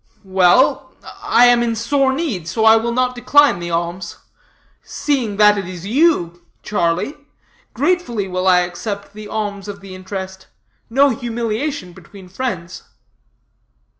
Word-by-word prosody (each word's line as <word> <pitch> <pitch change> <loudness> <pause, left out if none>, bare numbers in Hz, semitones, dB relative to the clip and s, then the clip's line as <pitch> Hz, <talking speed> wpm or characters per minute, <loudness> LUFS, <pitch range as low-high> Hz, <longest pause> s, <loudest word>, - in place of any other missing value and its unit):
"Well, 190 +6 +3 0.3
I 245 - +4
am 245 -1 +5
in 230 -1 0
sore 265 +4 +1
need, 265 - -3
so 220 +6 -1
I 220 0 +8
will 230 +1 0
not 250 +1 0
decline 255 -2 +3
the 175 0 -5
alms. 170 +1 -3 0.6
Seeing 250 -9 -2
that 210 -1 +5
it 190 - -6
is 180 -1 -8
you, 205 - +1 0.2
Charlie, 175 - -1 0.6
gratefully 280 - 0
will 185 0 -2
I 180 -1 +5
accept 200 +3 -5
the 215 0 -9
alms 205 -2 -4
of 200 -1 -7
the 195 -1 -11
interest. 190 0 -7 0.4
No 275 +4 +4
humiliation 235 -2 -3
between 185 +2 -14
friends." 185 -5 -5
210 Hz, 135 wpm, -18 LUFS, 185-245 Hz, 0.6 s, I